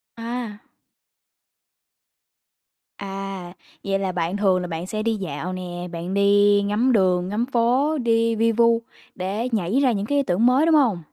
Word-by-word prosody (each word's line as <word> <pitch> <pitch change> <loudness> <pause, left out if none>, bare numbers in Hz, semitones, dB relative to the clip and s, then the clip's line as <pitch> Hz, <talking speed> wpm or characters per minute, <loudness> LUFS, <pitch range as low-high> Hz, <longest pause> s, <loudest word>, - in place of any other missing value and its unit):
À. 230 -2 -6 2.4
À, 195 -2 -6 0.3
vậy 195 0 -1
là 190 -1 -2
bạn 175 +2 -2
thường 190 -3 +2
là 180 - -4
bạn 165 +1 -5
sẽ 215 +1 -3
đi 225 -1 0
dạo 180 -1 -5
nè, 180 -1 -6
bạn 170 +3 -5
đi 205 0 +4
ngắm 210 +6 +1
đường, 185 -5 +2
ngắm 220 +4 -1
phố, 260 +5 +1
đi 230 -2 +1
vi 230 +1 +2
vu 230 0 +3 0.3
để 200 +7 -3
nhảy 210 +4 0
ra 265 -3 +3
những 200 -3 -2
cái 285 +6 0
ý 280 - +2
tưởng 205 +2 +1
mới, 260 +5 +4
đúng 330 - +4
hông? 240 - +3
205 Hz, 165 wpm, -22 LUFS, 185-235 Hz, 2.4 s, đi